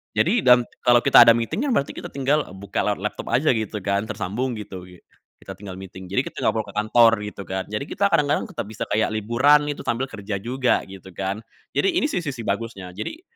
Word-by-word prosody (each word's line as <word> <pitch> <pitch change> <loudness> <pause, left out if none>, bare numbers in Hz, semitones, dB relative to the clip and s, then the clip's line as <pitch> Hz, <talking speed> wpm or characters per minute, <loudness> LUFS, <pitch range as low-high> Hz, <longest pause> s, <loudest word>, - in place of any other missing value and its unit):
jadi 215 +8 +3
dan 125 0 +7 0.2
kalo 120 -1 +6
kita - - +8
ada 115 - +9
meeting, 120 - -2
ya - - 0
berarti 140 - 0
kita - - -6
tinggal 140 +2 +1
buka 100 0 -5
lewat 105 -2 0
laptop 105 - -4
aja 145 +5 +3
gitu 110 -3 -3
kan, 100 +2 0
tersambung, 110 +4 -3
gitu 95 -4 -8
gi 90 -1 -16 0.3
kita - - -9
tinggal 95 -2 -9
meeting, 95 -1 -10
jadi 100 - 0
kita - - -7
enggak - - +3
perlu - - -1
ke - - -12
kantor, 115 +2 +5
gitu, 105 -1 -7
kan. 95 +2 -3
Jadi 105 +6 -3
kita 200 +6 0
kadang-kadang 150 +3 +1
tetap 170 - -5
bisa 105 +1 -6
kayak 110 +1 +1
liburan 130 +8 +3
itu 145 - -5
sambil 125 +3 -1
kerja 100 -2 -5
juga, 125 +3 +1
gitu, 95 -1 -12
kan. 100 +4 -4 0.3
Jadi 390 -2 +2
ini 310 -3 +1
sih 180 - -2
sisi 130 -5 -4
bagusnya, 100 -3 -4
jadi 110 - -7
110 Hz, 220 wpm, -23 LUFS, 100-135 Hz, 0.3 s, ada